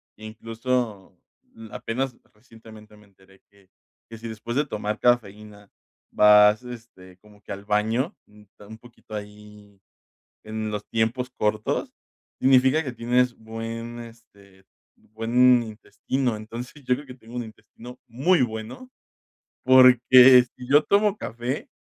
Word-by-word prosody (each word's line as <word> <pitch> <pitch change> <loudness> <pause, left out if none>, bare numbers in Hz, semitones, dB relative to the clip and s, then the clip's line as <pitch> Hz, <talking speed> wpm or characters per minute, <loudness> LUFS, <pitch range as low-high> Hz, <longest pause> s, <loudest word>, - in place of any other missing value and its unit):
que, 110 - -17
incluso, 115 -1 -4 0.5
apenas 125 +2 -4 0.2
recientemente 110 -2 -16
me 105 0 -20
enteré 95 -1 -24
que 100 -2 -27 0.4
que 115 - -9
si 115 +1 -9
después 115 +1 -7
de 150 - +1
tomar 105 -4 -4
cafeína 105 -4 -1 0.4
vas, 105 +2 +5
este, 115 -7 -12
como 105 +1 -22
que - - -11
al 100 +1 -8
baño 110 - -1
un 105 +1 -16
poquito 120 -2 -17
ahí 105 -1 -11 0.7
en 110 0 -5
los 105 -1 -5
tiempos 120 +3 -2
cortos 105 -2 -2 0.5
significa 130 +4 +3
que 130 - -5
tienes 125 +1 0
buen, 115 +1 -7
este, 100 -5 -17 0.3
buen 120 +3 +2
intestino. 115 +3 -4
Entonces, 115 +6 -9
yo 125 - +2
creo 140 +3 -6
que 125 - -11
tengo 120 -1 -15
un 120 - -3
intestino 120 +2 -14
muy 135 +7 +2
bueno, 115 - -7 0.7
porque 130 0 +7
si 125 - -10
yo 145 +3 +4
tomo 205 +3 +1
café, 125 - -5
115 Hz, 130 wpm, -24 LUFS, 105-125 Hz, 0.7 s, porque